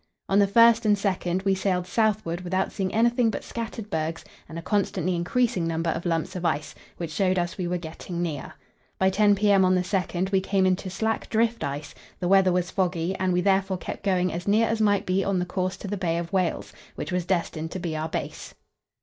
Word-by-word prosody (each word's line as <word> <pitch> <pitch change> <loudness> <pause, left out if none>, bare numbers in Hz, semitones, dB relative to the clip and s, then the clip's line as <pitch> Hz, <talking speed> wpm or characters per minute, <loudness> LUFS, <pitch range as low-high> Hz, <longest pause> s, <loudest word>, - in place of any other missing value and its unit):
On 195 - +3
the 200 - +5
1st 230 +2 +6
and 210 -1 +5
2nd 190 -2 -1
we 195 - +3
sailed 185 -2 0
southward 200 -4 0
without 185 +1 -1
seeing 190 -2 -2
anything 235 +1 +3
but - - -4
scattered 225 -2 -6
bergs 160 0 -2 0.2
and 165 - -7
a - - -4
constantly 185 -3 0
increasing 180 +1 0
number 165 0 0
of 170 - -3
lumps 165 0 -1
of 180 - -4
ice, 155 -3 -1 0.2
which 170 -2 -5
showed 185 +3 +1
us 175 -1 -1
we 180 - -1
were 180 +1 -1
getting 170 +1 -7
near. 160 -5 -4 0.4
By 190 0 +3
10 205 +1 +4
p.m. 200 -1 +4
on 185 0 +4
the 180 - +2
2nd 185 0 -1
we 190 -1 +3
came 195 0 +1
into 185 +1 0
slack 220 +4 -2
drift 230 +1 +1
ice; 140 +2 -4 0.3
the 180 - -1
weather 195 0 +5
was 180 0 0
foggy, 180 -2 0
and 185 0 +1
we 180 0 +2
therefore 195 0 +2
kept - - -6
going 185 -2 +1
as 175 +3 -5
near 220 +3 +4
as 225 -1 -1
might 205 -2 +2
be 185 +1 +1
on 195 -1 0
the 180 - 0
course 185 +1 -2
to 200 - -7
the 205 +1 -3
Bay 170 -3 0
of 170 +2 -5
Whales, 185 -3 -1 0.2
which - - -5
was 180 -1 0
destined 170 -3 -1
to 185 - -5
be 170 -3 -3
our 155 +1 -3
base. - - -5
185 Hz, 225 wpm, -25 LUFS, 175-200 Hz, 0.4 s, 1st